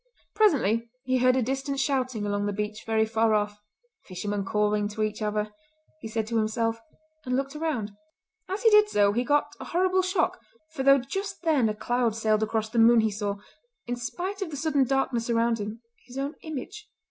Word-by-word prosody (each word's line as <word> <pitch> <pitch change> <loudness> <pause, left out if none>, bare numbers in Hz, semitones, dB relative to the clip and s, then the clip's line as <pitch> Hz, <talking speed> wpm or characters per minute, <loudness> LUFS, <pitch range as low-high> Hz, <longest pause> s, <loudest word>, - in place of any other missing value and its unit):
Presently 235 - +2
he 255 -1 +1
heard 255 0 +4
a 260 - +2
distant 270 +3 -2
shouting 255 -6 0
along 205 0 -1
the 205 - -1
beach 210 +1 -4
very 220 0 +2
far 220 0 +2
off. 210 0 -1 0.4
"The 185 - -13
fishermen 205 +2 -2
calling 210 +1 +1
to 215 +1 -3
each 215 0 -3
other," 210 0 -1 0.5
he 225 - -7
said 220 0 -2
to 230 +1 -1
himself 225 +1 0 0.4
and 250 -1 -1
looked 275 +2 -2
around. 300 -10 -2 0.6
As 390 +5 -3
he 450 - +6
did 420 0 +6
so 205 - +3
he 240 +3 +1
got 290 +2 +1
a - - -7
horrible 370 +2 +2
shock, 370 +1 0 0.3
for 310 -4 -4
though 275 +1 +6
just 385 +11 -5
then 290 -9 +3
a 210 - -2
cloud 240 0 0
sailed 220 -1 +1
across 220 0 0
the 235 - 0
moon 230 0 +7
he 220 -1 +1
saw, 205 0 -2 0.5
in 245 - -2
spite 360 - -4
of 385 - -2
the 295 - -6
sudden 290 -2 +2
darkness 255 -3 0
around 230 0 +2
him, 215 +3 -6 0.2
his 250 +1 -10
own 280 +2 -2
image. 335 +8 -7
235 Hz, 200 wpm, -27 LUFS, 215-275 Hz, 0.6 s, moon